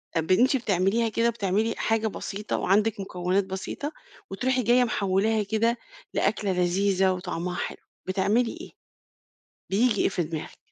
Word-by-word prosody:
آآ، - - +3
ب 160 - -3
أنتِ 250 +8 +5
بتعمليها 210 +1 +1
كده 230 +2 +2
بتعملي 215 +1 0
حاجة 225 0 +1
بسيطة 210 0 -4
وعندِك 205 +2 +2
مُكونات 185 0 0
بسيطة 190 +10 -5 0.4
وتروحي 255 +5 0
جاية 245 +3 +4
محولاها 210 0 +1
كده 225 +3 +1 0.4
لأكلة 200 -1 0
لذيذة 185 +1 +2
وطعمها 180 -1 -3
حلو؟ - - -4 0.3
بتعملي 205 +5 +1
إيه، - - -10 1.0
بييجي 215 +2 +2
إيه - - +3
في 180 -2 -1
دماغِك؟ 160 -1 -6
200 Hz, 140 wpm, -26 LUFS, 185-225 Hz, 1.0 s, أنتِ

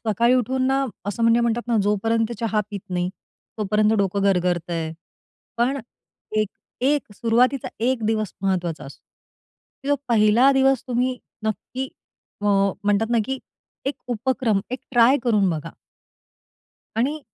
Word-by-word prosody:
सकाळी 235 +4 +3
उठून 255 +1 +1
ना, 270 +1 +2 0.2
असं 205 +3 -2
म्हणजे 230 +1 +5
म्हणतात 235 0 +1
ना 235 - +2
जोपर्यंत 225 +3 +1
चहा 220 -2 +1
पीत 200 -2 -5
नाही, 180 0 0 0.5
तोपर्यंत 210 +1 +2
डोकं 200 0 +1
गरगरत 180 -3 +1
आहे. 160 -1 -2 0.6
पण 255 +4 +1 0.6
एक 215 -1 +2 0.3
एक 275 -4 +1
सुरुवातीचा 240 +5 +2
एक 240 -1 +1
दिवस 215 -4 0
महत्वाचा 175 -5 -1
असतो. 135 - -12 0.9
जो 285 - +4
पहिला 230 +3 +5
दिवस 270 -1 +3
तुम्ही 250 0 0 0.3
नक्की 255 +4 -3 0.5
अ, - - -6 0.4
म्हणतात 205 +2 +2
ना, 235 - +3
की 265 0 -3 0.5
एक 280 - 0
उपक्रम 245 -2 +1
एक 255 - -2
ट्राय 245 +1 +6
करून 210 -5 +3
बघा. 160 0 -4 1.3
आणि 280 +7 0
225 Hz, 135 wpm, -23 LUFS, 200-255 Hz, 1.3 s, ट्राय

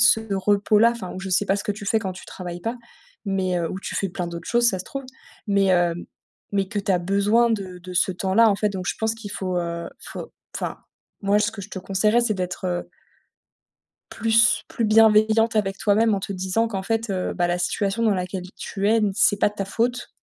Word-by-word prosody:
ce 230 -1 +6
repos-là. 205 +3 +3
Enfin 235 -6 -6
ou 185 - -6
je 190 0 -5
sais 185 +3 +2
pas 195 - +2
ce 200 - -5
que 205 - 0
tu 205 0 -9
fais 220 - +3
quand 195 -4 -4
tu 185 - -12
travailles 175 -1 -7
pas, 230 +7 -3 0.5
mais 190 -3 0
heu- 170 -1 -1
ou 190 - -5
tu - - -6
fais 195 - -1
plein 180 0 -4
d'autres 170 0 -7
choses 240 0 +4
ça 190 - 0
se 185 - -6
trouve- 275 0 -6 0.4
mais 200 -1 +2
hem, 175 -2 +2 0.5
mais 195 -1 0
que 210 - -3
tu 200 -1 0
as 180 - +3
besoin 200 +6 +2
de 190 -5 -3
de 180 +1 -9
ce 185 +2 +3
temps-là 195 +5 +3
en 200 - +1
fait, 210 - +1
donc 190 -3 -5
je - - 0
pense 220 0 0
qu'il 225 -2 -9
faut, 185 -2 -3
heu, 170 -1 -4
il - - -15
faut - - -7 0.2
enfin, - - -4 0.4
moi, 200 +1 +3
ce 210 - +1
que 210 -2 -8
je 200 - -10
te 190 - -5
conseillerais, 200 +5 +2
c'est 235 -3 +1
d'être 185 -1 -4
heu 175 -1 -2 1.2
plus 225 +1 +3
plus 230 - -1
bienveillante 220 +1 +4
avec 195 -2 0
toi-même 215 +2 +3
en 200 - 0
te 195 - -5
disant 190 +4 0
qu'en 195 -4 -4
fait, 225 +2 -1
heu, 185 -2 -2
bah, 175 -1 0
la 175 0 0
situation 195 +5 -1
dans 220 -2 +3
laquelle 185 0 -3
tu 200 0 -3
es, 225 +2 +4
n 210 -3 +2
c'est 205 0 +4
pas 205 - +3
de 205 - -18
ta 195 - -3
faute. 240 +5 -1
200 Hz, 240 wpm, -23 LUFS, 185-220 Hz, 1.2 s, ce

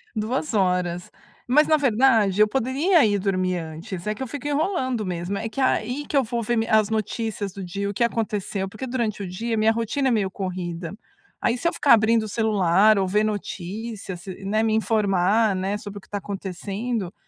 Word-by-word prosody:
2 240 +6 -2
horas, 180 -3 0 0.4
mas 295 +5 +4
na 310 - +5
verdade 225 -7 +3
eu 215 - +6
poderia 270 - +2
ir 205 -1 +1
dormir 185 -2 0
antes, 170 +3 -7
é 210 - +1
que 240 - -11
eu - - -5
fico 285 +4 -6
enrolando 285 - 0
mesmo, 180 +2 -3
é 225 - -3
que 275 - -7
aí 260 +3 0
que - - -5
eu 275 - +4
vou 235 0 -2
ver 240 +2 0
mi 225 - 0
as 215 -2 +3
notícias 220 -1 -2
do 195 -1 -7
dia, 200 +3 -3
o - - -4
que 235 - 0
aconteceu. 210 -4 -2
Porque 215 +6 -7
durante 235 -5 -2
o 195 - -4
dia 225 +6 -3
minha 220 +1 +4
rotina 230 +5 -1
é - - +3
meio 205 -5 +1
corrida, 180 -3 -4 0.5
aí 235 - +1
se 335 - -1
eu - - +1
ficar 280 - +5
abrindo 225 0 +4
o - - -4
celular 210 -2 +3
ou 195 - +2
ver 210 +3 +2
notícias, 205 -1 -5
se 190 +1 -9
né, 215 +3 +1
me 220 -1 +1
informar, 215 -1 +2
né, 190 +2 -1
sobre 205 -1 -8
o - - -19
que 190 - -22
tá 205 - -3
acontecendo, 200 +2 -4
215 Hz, 210 wpm, -24 LUFS, 190-235 Hz, 0.5 s, eu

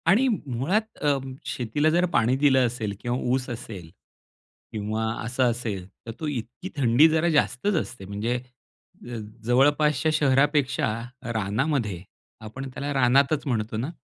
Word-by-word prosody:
आणि 220 +10 +5
मुळात 195 - -1
अ, 145 -2 +3 0.3
शेतीला 130 +6 0
जर 175 +3 +3
पाणी 120 +3 +3
दिलं 135 -2 +4
असेल 110 -4 -4
किंवा 120 +2 -2 0.2
ऊस 130 0 -1
असेल, 110 -8 -7 0.8
किंवा 110 +1 -2 0.2
असं 125 +1 +1
असेल 110 -6 -4 0.2
तर - - -3
तो 155 - -3
इतकी 125 +5 -5
थंडी 130 +3 +5
जरा 160 +2 +2
जास्तच 160 +4 +1
असते 120 -6 -9
म्हणजे 105 +5 -2
अ, 125 -1 -14 0.3
जवळपासच्या 145 +6 +3
शहरापेक्षा 140 -3 +2 0.4
रानामध्ये, 110 - -1 0.4
आपण 130 +5 -7
त्याला 145 +2 -3
रानातच 135 +3 +3
म्हणतो 110 -3 -1
ना, 125 +7 -2
130 Hz, 130 wpm, -25 LUFS, 115-145 Hz, 0.8 s, आणि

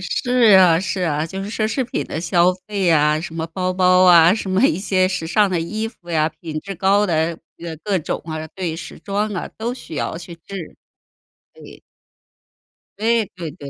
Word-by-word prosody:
是 185 +7 -3 0.3
啊， 175 -3 +5
是 190 0 -3
啊， 155 -2 0
就 190 +3 -6
是 205 - -6
奢 215 0 -1
侈 255 +4 -1
品 - - -3
的 - - -4
消 175 +1 +3
费 195 -4 0
啊， 150 -1 +3
什 165 0 -7
么 165 0 -3
包 185 +2 -2
包 185 0 +4
啊， 175 +1 +7
什 200 -3 -4
么 190 +6 +2
一 315 - 0
些 185 -2 +1
时 180 -3 -3
尚 205 +3 +2
的 175 -3 0
衣 215 +7 -3
服 180 -6 -20
呀， 155 -1 +2
品 155 -2 -5
质 195 0 -7
高 200 +3 +2
的 165 -1 0 0.2
呃， 165 -1 -7
各 200 -3 +1
种 155 - -4
啊， 155 -1 -5
对， 175 -3 -4
时 - - -9
装 205 +1 -2
啊， 180 - -4
都 235 +3 -3
需 165 - -10
要 160 - -2
去 170 0 -9
置， 175 0 -9 0.8
对。 - - -14 1.2
对， 225 -1 +1
对， 170 -4 -6
对， 140 0 -10
180 Hz, 215 characters per minute, -20 LUFS, 165-200 Hz, 1.2 s, 啊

